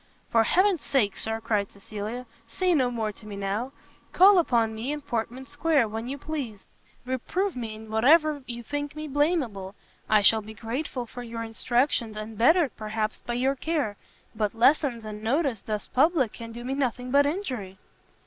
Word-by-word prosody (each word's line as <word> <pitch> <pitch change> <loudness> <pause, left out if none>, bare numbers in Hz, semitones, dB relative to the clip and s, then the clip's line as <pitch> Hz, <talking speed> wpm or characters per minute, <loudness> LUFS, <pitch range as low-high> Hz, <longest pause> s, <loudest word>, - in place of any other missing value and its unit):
"For 230 -1 +5
Heaven's 370 - +3
sake, 215 -8 +1
Sir," 220 0 -2
cried 210 -3 -1
Cecilia, 215 +4 -6 0.2
"say 360 +10 +1
no 260 -6 +3
more 225 -3 -2
to 215 +1 -14
me 205 - -6
now: 200 +6 -2 0.4
call 385 +1 +7
upon 230 -8 +2
me 225 +5 -3
in 295 0 -3
Portman 245 0 -3
square 290 -3 +2
when 225 +2 -5
you 275 +2 -4
please, 275 -9 -5 0.4
reprove 330 +10 -1
me 225 -3 -4
in 220 0 -11
whatever 295 +6 +4
you 240 -1 -6
think 290 +3 -4
me 305 0 -5
blameable, 270 - 0 0.3
I 215 -1 +5
shall 220 +2 +5
be 215 +1 -10
grateful 245 +3 -4
for 245 +2 -9
your 230 -1 -5
instructions, 230 0 0
and 215 +1 -6
bettered, 285 - +4
perhaps, 215 0 -3
by 240 - -4
your 265 +3 +1
care; 290 -7 -1 0.4
but 215 0 -1
lessons 245 -1 +3
and 210 0 -6
notice 255 - 0
thus 210 -1 -3
public 275 -4 +2
can 230 -1 -8
do 240 +1 -8
me 260 - -2
nothing 250 -2 -2
but 285 +1 +5
injury." 255 - -4
240 Hz, 175 wpm, -27 LUFS, 220-285 Hz, 0.4 s, call